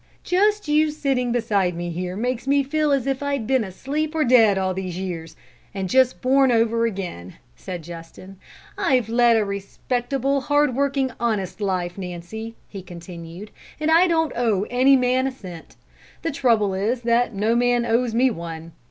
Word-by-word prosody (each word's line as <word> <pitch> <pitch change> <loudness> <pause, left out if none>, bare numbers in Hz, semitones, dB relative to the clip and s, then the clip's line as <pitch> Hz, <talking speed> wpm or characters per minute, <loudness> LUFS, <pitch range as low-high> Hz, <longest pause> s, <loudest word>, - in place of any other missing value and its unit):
"Just 415 +1 +1
you 305 +1 +3
sitting 270 -5 -1
beside 205 -7 0
me 175 0 -4
here 180 +2 -4
makes 250 +3 -2
me 280 0 +3
feel 305 +2 0
as 275 -3 +1
if 270 0 -1
I'd 280 -5 -2
been 260 0 +2
asleep 285 - -3
or 315 - +2
dead 230 -6 +5
all 190 -1 0
these 185 -2 -5
years, 165 -4 -5 0.4
and 190 -1 -2
just 260 +5 +2
born 265 0 +4
over 230 0 +2
again," 180 - -6 0.2
said 175 - -7
Justin. 170 +3 -11 0.4
"I've 250 -5 +2
led 235 0 +4
a 215 - +1
respectable, 245 +7 -2
hard 290 0 +2
working, 275 -1 0
honest 215 -4 -2
life, 185 -2 -2
Nancy," 190 +5 -7
he 195 - -8
continued, 175 +2 -10 0.3
"and 310 +1 +1
I 340 +3 +6
don't 325 -2 +1
owe 220 -5 +1
any 260 +3 +5
man 255 +1 +2
a - - -2
cent; 180 -10 -11 0.5
the 330 - -1
trouble 225 -8 +2
is 220 +6 -1
that 235 -1 +1
no 215 +4 +1
man 245 0 +2
owes 235 0 +1
me 255 +2 +3
one. 165 -3 -7
235 Hz, 170 wpm, -22 LUFS, 190-265 Hz, 0.5 s, I